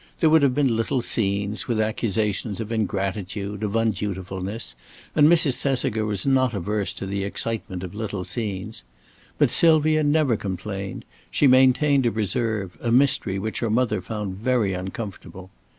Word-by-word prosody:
There 160 -2 +4
would 160 -1 +6
have 135 -3 +3
been 135 -5 +2
little 120 +3 0
scenes, 100 -2 0
with 115 -3 0
accusations 110 -1 -1
of 110 0 -5
ingratitude, 100 -1 -3
of 105 -2 -2
undutifulness, 100 - -2 0.4
and 150 0 +6
Mrs. 155 -6 +4
Thesiger 110 -5 0
was 100 -3 -1
not 130 -3 +2
averse 100 +1 -2
to - - -5
the 100 0 -2
excitement 100 -2 -4
of 90 - -7
little 105 -3 -4
scenes. 100 - -4 0.6
But - - +3
Sylvia 155 -1 +4
never 145 -4 +2
complained; 95 0 -5 0.2
she - - +2
maintained 130 +1 +4
a - - +1
reserve, 105 -5 -2
a 115 - -1
mystery 130 -6 +3
which 110 +3 -3
her 115 - -1
mother 110 -3 +1
found 105 -1 -5
very 115 -3 +1
uncomfortable. 95 0 -7
110 Hz, 150 wpm, -24 LUFS, 100-125 Hz, 0.6 s, would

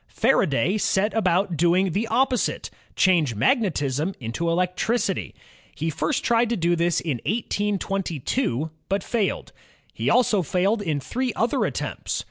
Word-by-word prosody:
Faraday 195 - +1
set 205 +2 +1
about 185 -3 +1
doing 175 +3 +2
the 210 +7 -1
opposite, 255 0 0 0.2
change 165 - +3
magnetism 155 - 0
into 125 +8 -3
electricity. 180 +7 -1 0.4
He 160 +1 -2
first 275 - -1
tried 235 0 +2
to 235 - 0
do 175 0 +2
this 170 0 +1
in 140 -9 -3
1822, 195 - -1 0.2
but 195 0 0
failed. 220 -5 -2 0.4
He - - -1
also 220 -5 +3
failed 185 +7 0
in 155 -7 -1
three 250 - -2
other 230 +1 +1
attempts. - - -3
190 Hz, 130 wpm, -24 LUFS, 165-220 Hz, 0.4 s, change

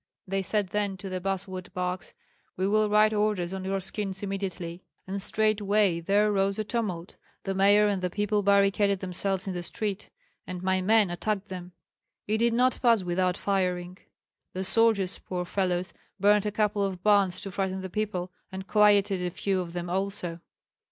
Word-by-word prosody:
They 195 +1 -1
said 200 0 -1
then 205 -1 -1
to 190 +1 -7
the 185 -1 -4
basswood 190 -1 -4
barks, 180 0 -3 0.4
'We 190 +1 +1
will 215 0 +3
write 215 +1 +4
orders 205 -4 0
on 190 -1 -4
your 195 +1 -1
skins 195 0 -4
immediately.' 185 -3 -4 0.2
And 195 +1 -4
straightway 205 -3 +2
there 205 +5 +2
rose 195 0 +1
a 215 - -1
tumult. 205 -6 -3 0.3
The 195 - -2
mayor 200 +2 +5
and 200 -2 0
the 180 - -1
people 205 +2 0
barricaded 200 0 +3
themselves 190 +1 -1
in 190 - -2
the 175 - -3
street, 205 +3 -4 0.4
and 180 0 -6
my 190 0 +1
men 210 -1 +3
attacked 205 +2 -2
them; 180 -1 -7 0.5
it 215 +1 0
did 235 0 +3
not 255 +1 +2
pass 230 -5 +4
without 180 +1 0
firing. 180 -2 -1 0.6
The 190 - -2
soldiers, 205 -2 +3
poor 180 -1 -4
fellows, 180 -1 -1 0.3
burned 205 +1 +4
a - - -1
couple 210 -1 +1
of 185 -2 -3
barns 200 -4 +3
to 195 - -5
frighten 190 0 -2
the 190 - -5
people, 185 -2 -3 0.2
and 190 0 -6
quieted 205 -2 +4
a 180 - 0
few 190 +2 -1
of 170 -1 -7
them 175 0 -4
also." 180 -2 -2
195 Hz, 180 wpm, -27 LUFS, 185-205 Hz, 0.6 s, mayor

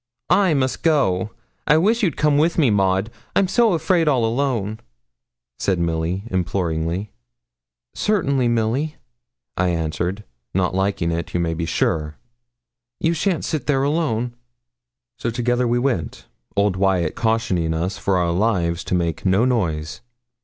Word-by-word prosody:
'I 190 -6 +4
must 130 -2 0
go. 120 - +2 0.4
I 150 - +5
wish 220 +8 +2
you'd 175 - 0
come 150 -1 +3
wi' 160 +3 +4
me, 140 -9 +4
Maud, 95 +1 +1 0.2
I'm 195 - +3
so 225 +2 +3
afraid 165 0 +2
all 130 -6 +3
alone,' 115 -4 -1 0.8
said 95 -2 +1
Milly, 85 +2 -1
imploringly. 90 +1 -1 0.8
'Certainly, 140 - +1
Milly,' 120 +7 0 0.6
I 90 - +2
answered, 85 +4 -2 0.3
not 90 -1 +1
liking 95 -3 0
it, 85 +1 -4
you - - +2
may 85 -1 0
be 80 0 -3
sure; 75 -1 -1 0.8
'you 165 - +1
shan't 170 +1 0
sit 155 -5 -3
there 135 -2 +2
alone.' 125 -6 0 0.9
So 115 - -1
together 120 +1 0
we 120 +1 +2
went, 120 - -2 0.3
old 100 -2 +2
Wyat 95 -4 +1
cautioning 110 -8 0
us 90 +4 -2
for 95 -2 +1
our 85 -1 +1
lives 85 -4 0
to - - 0
make 85 -3 -1
no 95 +5 +3
noise. 85 -12 -1
105 Hz, 145 wpm, -21 LUFS, 90-140 Hz, 0.9 s, I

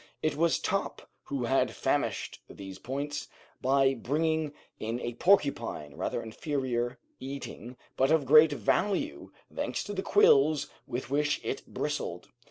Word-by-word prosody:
It 155 -2 +1
was 165 +2 +3
Top - - -2 0.2
who 140 -3 -3
had 135 +3 +1
furnished - - -1
these 95 -1 -9
points, 145 +3 -4 0.3
by 135 +1 +4
bringing 155 +4 0 0.3
in 115 +2 -3
a 120 -1 -4
porcupine, 120 - +1
rather - - -3
inferior 120 0 -2 0.2
eating, 130 -2 -7 0.2
but 135 +1 +3
of 160 -3 +3
great 155 +3 +7
value, 205 - 0 0.2
thanks - - -2
to 205 - -5
the 190 - -2
quills 155 -7 +4 0.2
with 125 +1 -4
which 145 +1 +1
it - - -4
bristled. - - -3
140 Hz, 135 wpm, -29 LUFS, 125-155 Hz, 0.3 s, great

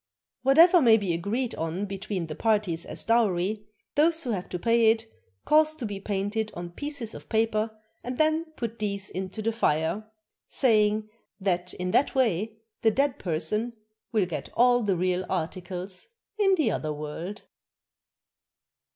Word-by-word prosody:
Whatever 325 +7 +7
may 230 -4 +7
be 195 -5 -1
agreed 215 +9 -2
on 165 +5 -3
between 195 -2 -4
the 155 - -6
parties 205 -5 0
as - - -4
dowry, 210 -2 +1 0.3
those 325 +2 +4
who 245 - -2
have 185 -4 -3
to 180 - -3
pay 230 +3 +4
it 225 0 +1 0.4
cause 310 0 +4
to 275 -6 -5
be 205 -2 -4
painted 205 +2 -2
on 175 0 -6
pieces 280 - -5
of - - -11
paper 220 -1 +1 0.3
and 250 +1 -4
then 315 +1 +2
put 230 -1 -4
these 200 -2 -2
into 190 +3 -5
the 225 - +1
fire, 205 0 0 0.4
saying 215 -4 +2 0.3
that 180 -2 -1
in 180 0 -3
that 275 - +2
way 220 -3 +1 0.2
the 225 - +5
dead 275 +4 +1
person 195 +8 -1 0.4
will 215 -5 +2
get 170 -3 -5
all 245 0 +5
the 200 -4 +1
real 180 +1 0
articles 180 +1 -4 0.3
in 390 -2 +4
the 315 -5 +1
other 155 - -2
world. 155 +6 -6
215 Hz, 155 wpm, -27 LUFS, 185-235 Hz, 0.4 s, Whatever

